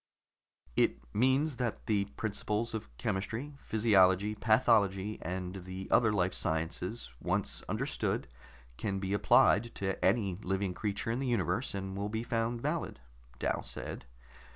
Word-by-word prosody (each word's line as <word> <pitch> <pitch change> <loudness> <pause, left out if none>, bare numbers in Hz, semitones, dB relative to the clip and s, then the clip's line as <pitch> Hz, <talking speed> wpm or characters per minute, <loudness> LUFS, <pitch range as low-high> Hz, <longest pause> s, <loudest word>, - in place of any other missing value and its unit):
"It - - +3 0.2
means 130 +5 +2
that 120 -3 -2
the 100 -2 +2
principles 105 +2 -2
of 110 -1 -4
chemistry, 115 +6 -2
physiology, 105 -3 +4
pathology 105 -2 +3
and 90 +2 -4
the 95 +1 -6
other 110 -3 +5
life 95 -3 +1
sciences, 80 - -2
once - - 0
understood, - - -1 0.5
can 100 -2 -2
be 95 0 -2
applied 110 +2 +4
to 95 -1 -2
any 95 -2 +2
living 95 -2 -1
creature 105 +3 -2
in 120 - -1
the 135 - -1
universe, 120 -1 0
and 95 -1 -4
will 100 +1 -2
be 110 +1 -2
found 115 0 -1
valid," 150 - -2 0.4
Dal - - 0
said. - - -6
105 Hz, 135 wpm, -32 LUFS, 95-115 Hz, 0.5 s, other